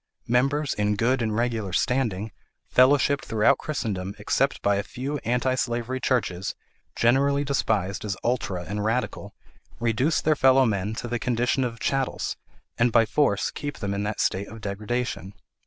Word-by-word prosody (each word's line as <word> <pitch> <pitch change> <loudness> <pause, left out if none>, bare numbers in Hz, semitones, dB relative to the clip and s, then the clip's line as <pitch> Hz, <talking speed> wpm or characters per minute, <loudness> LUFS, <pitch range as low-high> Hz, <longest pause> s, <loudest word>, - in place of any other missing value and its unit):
Members 135 +5 +1
'in 105 0 0
good 125 +5 +1
and 110 -2 -1
regular 115 -5 -1
standing,' 110 -4 0 0.4
fellowshipped 140 +2 +4
throughout 115 +5 +3
Christendom 100 -10 -3
except - - 0
by 100 0 +3
a - - +1
few 135 +7 -4
anti 125 +2 0
slavery 120 0 -2
churches 100 -8 -1 0.4
generally 140 +4 +3
despised 105 -9 0
as 100 -2 -3
ultra 100 -7 -1
and 105 +3 -4
radical, 115 +4 -2 0.4
reduce 120 +7 +1
their 155 0 +2
fellow 135 -1 +5
men 105 -1 -1
to 120 - -5
the 120 0 -2
condition 125 +2 +1
of 115 -2 -3
chattels, 135 +2 -1 0.4
and 120 0 +4
by 115 0 +5
force 110 -5 +1
keep 145 0 -5
them 100 -1 -3
in 100 - -2
that 105 +1 -3
state 100 +2 0
of 110 - -10
degradation. 105 -1 -3
120 Hz, 155 wpm, -25 LUFS, 105-130 Hz, 0.4 s, fellow